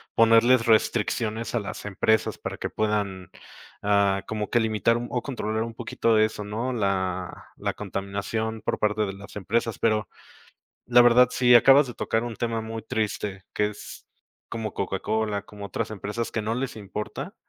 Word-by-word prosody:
ponerles 115 +2 +5
restricciones 110 0 +1
a 120 - +1
las 105 0 -7
empresas 105 +2 +1
para - - -5
que - - -4
puedan, 100 -4 -1 0.5
ah, 100 -1 +2
como 105 -1 -3
que 120 - +3
limitar 110 +1 +2
un 120 0 -4
o 125 - -1
controlar 110 -6 -3
un 115 0 -4
poquito 115 -1 0
de 110 0 +5
eso, 110 -1 -5
¿no? 115 +5 -3
La 95 -4 -2
la - - -3
contaminación 105 +3 -3
por - - -2
parte 105 0 +1
de 95 - -4
las 100 +1 -12
empresas, 115 +3 -1
pero 110 -1 +1 0.8
la 120 0 +7
verdad, 120 +1 +6
si 125 -1 +4
acabas 135 +4 +7
de 120 - -6
tocar 110 +1 -1
un 120 -2 -5
tema 115 -1 -2
muy 110 0 -5
triste, 105 -4 -3
que 105 - +1
es 105 - -10 0.4
como 110 -3 -4
Coca-Cola, 100 +2 -2
como 100 -1 -9
otras 95 - -3
empresas 105 +3 -4
que 110 - -2
no 110 +2 -2
les 130 +1 -3
importa, 105 0 -6
110 Hz, 170 wpm, -25 LUFS, 105-115 Hz, 0.8 s, la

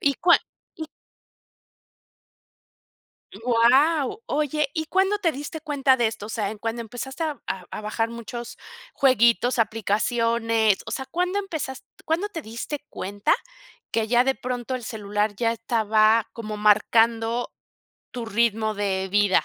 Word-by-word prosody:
¿Y 280 -1 +2
cuál? 345 +5 +5 0.4
Y 315 -1 -7 2.6
Wao. 265 - +3
Oye, 300 0 0
¿y 315 -1 -2
cuándo 385 +4 +2
te 340 -5 +2
diste 295 +3 -7
cuenta 280 -4 +2
de 235 -3 +2
esto? 215 -2 -6
O 215 - -9
sea, 210 -3 -2
¿en 215 - -8
cuando 230 +2 -3
empezaste 265 +7 -6
a 305 -3 -3 0.3
a - - -6
bajar 225 +2 -1
muchos, 235 +1 -7 0.4
jueguitos, 245 -2 +3
aplicaciones? 225 0 +1
O - - -7
sea, 265 - -3
¿cuándo 360 +5 -1
empezas 315 -9 -5 0.2
cuándo 335 +6 0
te 335 -6 -6
diste 235 +6 -6
cuenta 200 +2 -1 0.6
que, 225 -1 0
ya 240 +2 +4
de 265 +1 0
pronto 250 0 -4
el 240 - -8
celular 210 -1 -2
ya 230 +2 +1
estaba 220 -1 +2
como 215 -2 -6
marcando, 225 +3 +2 0.6
tu 240 -2 -6
ritmo 220 0 +1
de 190 -2 -1
vida? 205 -1 +3
235 Hz, 140 wpm, -24 LUFS, 220-280 Hz, 2.6 s, cuál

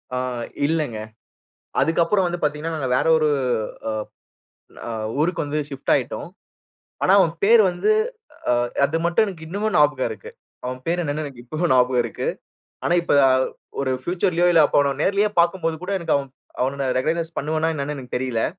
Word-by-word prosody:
அ - - -1 0.5
இல்லங்க. 150 -8 -1 0.8
அதுக்கு 160 +4 +2
அப்புறம் 190 +2 +2
வந்து 175 0 -3
பார்த்தீங்கன்னா 150 +2 -1
நாங்க 135 -4 -2
வேற - - +1
ஒரு 155 -1 +2 0.6
அ - - -2 1.0
அ - - -4 0.3
ஊருக்கு 165 +1 0
வந்து 145 +1 -2
ஷிஃப்ட் 135 -2 -2
ஆயிட்டோம். - - -2 0.7
ஆனா, 185 - +4
அவன் 165 -4 +3
பேரு 225 +2 +7
வந்து 175 - 0 0.6
அ - - +4 0.3
அது 160 +3 -1
மட்டும் 175 +6 +3
எனக்கு 170 -5 -7
இன்னமும் 205 +5 -2
ஞாபகம் 145 -3 +3
இருக்கு. 470 - -8 0.3
அவன் 125 0 -4
பேரு 175 +2 0
என்னன்னு 155 0 -2
எனக்கு 135 -4 -9
இப்பவும் 155 +5 0
ஞாபகம் 125 0 +3
இருக்கு. - - -3 0.6
ஆனா, - - +2
இப்ப - - +1 0.7
ஒரு 135 -1 0
ஃபியூச்சர்லையோ 175 +2 +1
இல்ல 165 -2 +6
அவனை 140 -1 +3
நேர்லேயே 200 +2 +2
பார்க்கும்போது 170 -2 +1
கூட, 185 - -4
எனக்கு 165 -2 +1 0.5
அவனை 135 +1 -1
ரிகாக்னைஸ் 165 +4 -2
பண்ணுவேனா 155 +2 0
என்னன்னு 145 0 -3
எனக்கு 130 -2 -7
தெரியல்ல. 125 -3 -1
160 Hz, 160 wpm, -22 LUFS, 140-175 Hz, 1.0 s, பேரு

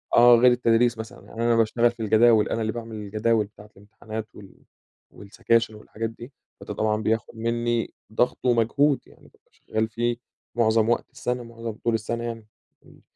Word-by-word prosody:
آه. 120 0 +8
غير 125 +1 +6
التدريس 120 -1 +2
مثلًا، 110 0 -9
يعني 115 +1 -5
أنا 120 0 +3
باشتغل 115 +1 +3
في 120 - -23
الجداول، 110 0 +4
أنا 115 - -1
اللي 110 0 -1
باعمل 115 -2 -7
الجداول 110 +1 0
بتاعة 105 +1 -16
الامتحانات 110 +2 -8
وال 100 -2 -15 0.5
والسكاشن 110 +2 -1
والحاجات 110 +1 -5
دي، 120 +4 -12 0.3
فده - - -6
طبعًا 110 0 0
بياخُد 110 +1 -1
منّي 115 0 -1 0.2
ضغط 120 - +1
ومجهود. 125 +4 +3
يعني - - -21
بابقى - - -29
شغّال 110 0 -3
فيه 120 +1 -1 0.4
معظم 110 -1 +3
وقت 120 - 0
السَنة، 125 -2 -3
معظم 115 -1 -7
طول 115 +2 -2
السَنة 115 +2 -2
يعني. 115 -2 -6 0.4
إمم. - - -19
115 Hz, 170 wpm, -24 LUFS, 110-120 Hz, 0.5 s, آه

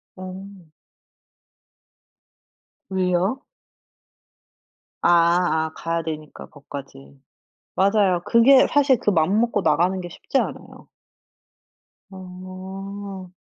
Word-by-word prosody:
어. 185 -2 -10 2.2
왜요? 190 +7 0 1.6
아 - - +4 0.6
아 - - -10
가야 165 0 -3
되니까 155 -2 -7
거기까지. 135 - -11 0.6
맞아요. 195 -2 +2
그게 255 +5 +6
사실 280 -3 +3
그 210 - 0
맘 185 +4 +2
먹고 235 -3 0
나가는 175 +4 +2
게 175 - -7
쉽지 175 - -2
않아요. - - -6 1.2
어. 190 +1 -9
185 Hz, 155 characters per minute, -22 LUFS, 170-200 Hz, 2.2 s, 그게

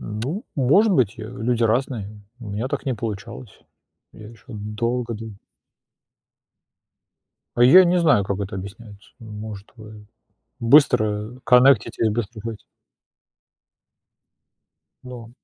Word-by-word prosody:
Ну, 125 - -5
может 170 - +3
быть, 125 - +1
э, - - -7
люди 120 +1 -2
разные, 110 -3 -2 0.2
у 115 -4 -10
меня 110 +6 -3
так 145 0 -5
не 130 - 0
получалось. 110 +1 -8 0.5
Я 110 -1 -12
ещё 115 -3 -18
долго 115 +3 -4
дыль 110 -2 -9 2.2
А 120 - +3
я 180 +10 +8
и - - +2
не 180 +1 +2
знаю, 150 - +3
как 100 0 -3
это 100 0 -5
объясняется. 100 +2 -11
Может, 105 -2 -9
вы 110 -2 -13 0.5
быстро 115 -3 +2
коннектитесь 125 -2 +4
быстро 110 0 -4
хоть. 115 -1 -7 2.4
Но. 120 -3 -10
115 Hz, 115 wpm, -22 LUFS, 105-125 Hz, 2.4 s, я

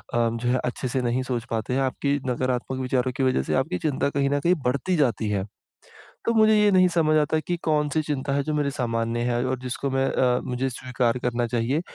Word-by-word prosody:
जो 115 0 0
है 130 +1 +2
अच्छे 125 +1 -3
से 130 +1 -1
नहीं 120 +1 0
सोच 125 -2 -3
पाते 115 +2 -2
हैं। 135 - +1
आपकी 140 +2 0
नकारात्मक 130 +1 -1
विचारों 130 0 0
की 135 - 0
वज़ह 130 - +2
से - - -2
आपकी 90 - -4
चिंता 140 -1 0
कहीं 140 -1 0
न 145 0 +1
कहीं 180 +2 +5
बढ़ती 140 +9 0
जाती 120 -8 +1
है। 100 -2 -1 0.8
तो 230 - +2
मुझे 220 -1 +5
ये 210 0 +5
नहीं 185 -1 +5
समझ 165 -3 +2
आता 155 +1 +2
कि 175 +3 -2
कौन-सी 150 0 +1
चिंता 145 -2 -2
है 140 0 +1
जो 155 +2 -2
मेरे 145 -2 +1
सामान्य 115 -3 -1
है 120 0 0
और 130 0 -1
जिसको 130 +2 -3
मैं 135 0 +1
अ, 125 -1 +2
मुझे 125 +2 -2
स्वीकार 125 -1 -1
करना 120 -1 0
चाहिए, 120 +6 0
130 Hz, 220 wpm, -24 LUFS, 120-145 Hz, 0.8 s, कहीं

